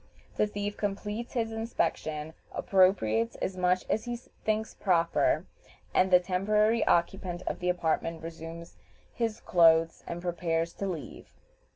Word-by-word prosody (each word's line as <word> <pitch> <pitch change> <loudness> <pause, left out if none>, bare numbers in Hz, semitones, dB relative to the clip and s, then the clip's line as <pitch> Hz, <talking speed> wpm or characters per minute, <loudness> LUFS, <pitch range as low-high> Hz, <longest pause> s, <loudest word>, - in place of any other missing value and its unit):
The 210 - +2
thief 205 0 -4
completes 210 +3 -3
his 225 -2 -1
inspection, 160 -9 -2 0.2
appropriates 150 - +2
as 190 - -3
much 180 0 +1
as 220 - 0
he 240 0 -3
thinks 220 -2 -3
proper, 175 -4 +2 0.5
and 185 - +4
the 180 -1 +7
temporary 210 +5 +2
occupant 175 0 +1
of - - -3
the 180 - -1
apartment 165 -1 -1
resumes 165 +1 -8 0.4
his 230 -2 -2
clothes 165 -1 +4
and 170 - -4
prepares 170 -1 -1
to 200 - -4
leave. 170 -5 -6
180 Hz, 135 wpm, -29 LUFS, 165-210 Hz, 0.5 s, the